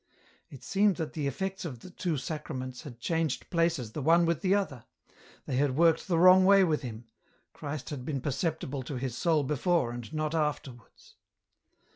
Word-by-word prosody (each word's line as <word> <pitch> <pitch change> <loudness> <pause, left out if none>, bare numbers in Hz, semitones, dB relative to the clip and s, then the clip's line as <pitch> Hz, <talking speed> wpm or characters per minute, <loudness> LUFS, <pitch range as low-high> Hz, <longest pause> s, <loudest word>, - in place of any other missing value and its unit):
It 130 -3 -12
seemed 200 +5 +2
that 160 -3 -4
the 150 -4 -2
effects 190 +7 -3
of 130 -9 -6
the 185 - -11
two 175 -3 -2
Sacraments 130 -4 -5
had 130 -7 -10
changed 160 +2 -2
places 165 -10 0
the 150 - -5
one 165 +4 +4
with 165 -2 0
the 190 +1 +3
other; 150 - -2 0.6
they 125 - -2
had 140 -1 +1
worked 165 0 +3
the 175 -3 +1
wrong 185 +2 +7
way 195 +1 +6
with 155 -5 +1
him; 120 -3 -7 0.5
Christ 150 +1 -6
had 135 -4 -5
been 140 +1 -3
perceptible 145 0 -2
to 135 +2 -6
his 125 -1 -3
soul 155 +1 +2
before 150 -1 +1
and 120 +1 -7
not 155 0 -2
afterwards. 145 -6 -4
150 Hz, 180 wpm, -29 LUFS, 130-170 Hz, 0.6 s, wrong